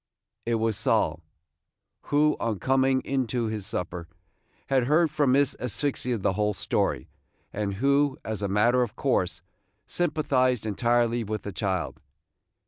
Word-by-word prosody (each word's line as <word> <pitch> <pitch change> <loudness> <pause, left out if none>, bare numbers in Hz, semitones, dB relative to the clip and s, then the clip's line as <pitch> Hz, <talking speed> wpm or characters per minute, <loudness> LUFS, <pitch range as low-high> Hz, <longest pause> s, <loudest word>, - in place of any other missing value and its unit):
It 120 - +2
was 110 -2 0
Sol, - - +1 0.8
who, 150 +1 +3
on 115 -3 -1
coming 130 +3 +2
in 135 -2 -1
to 120 +1 -1
his 110 -3 -3
supper, 90 -4 -4 0.6
had 130 -3 +2
heard 155 +3 +3
from 145 -4 +2
Miss 140 0 +3
Asphyxia 125 0 -1
the 95 -1 0
whole 105 +1 0
story, - - -1 0.5
and 100 -1 -2
who, 140 +4 +2
as 110 -1 -4
a 100 - 0
matter 115 +6 +3
of 120 -4 -2
course, - - 0 0.4
sympathized 130 -8 +1
entirely 120 +2 +1
with 110 -1 -4
the 100 - -5
child. 95 -2 -2
120 Hz, 140 wpm, -26 LUFS, 105-135 Hz, 0.8 s, who